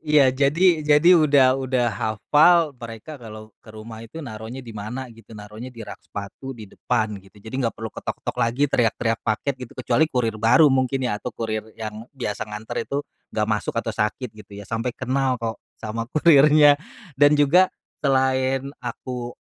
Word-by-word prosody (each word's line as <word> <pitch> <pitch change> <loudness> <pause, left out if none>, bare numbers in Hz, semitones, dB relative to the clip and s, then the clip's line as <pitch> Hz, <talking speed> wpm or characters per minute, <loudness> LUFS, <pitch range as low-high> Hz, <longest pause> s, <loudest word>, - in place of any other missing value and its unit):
Iya 150 -4 +4
jadi 155 +5 +3
jadi 150 +3 +5
udah 140 -5 +5
udah 130 -2 0
hafal 150 - +3
mereka 120 +3 -9
kalo 110 -1 -10
ke - - -20
rumah 110 +1 -10
itu 115 +7 -12
naruhnya 115 +3 -8
di 115 - -9
mana 110 +5 -5
gitu 110 -1 -14
naruhnya 105 +4 -9
di 115 -3 -10
rak 105 - -10
sepatu 105 +6 -8
di 110 - -9
depan, 110 -5 -1
gitu. 95 +2 -21
Jadi 110 +4 -11
nggak 115 -2 -1
perlu 110 -2 -6
ketok-ketok - - -5
lagi 120 +5 +2
teriak-teriak 115 -4 +1
paket 110 +6 -1
gitu, 125 - -8
kecuali 155 +5 +2
kurir 115 -5 -1
baru 125 +6 +5
mungkin 130 0 0
ya 105 -4 -2
atau - - -4
kurir 110 -1 -3
yang 110 +1 -7
biasa 105 -4 -4
nganter 105 +1 -7
itu 140 +1 -2 0.2
nggak 105 0 -2
masuk 105 - -2
atau 115 -1 -1
sakit 110 +4 -2
gitu 105 -1 -16
ya, 100 - -8
sampai 115 +4 -3
kenal 130 0 0
kok 115 -1 -5 0.2
sama 115 +2 -5
kurirnya. 150 -1 +6 0.3
Dan 145 +2 +4
juga 170 +6 +5 0.3
selain 130 -1 +1
aku, 125 0 -6
125 Hz, 170 wpm, -23 LUFS, 110-140 Hz, 0.3 s, kurirnya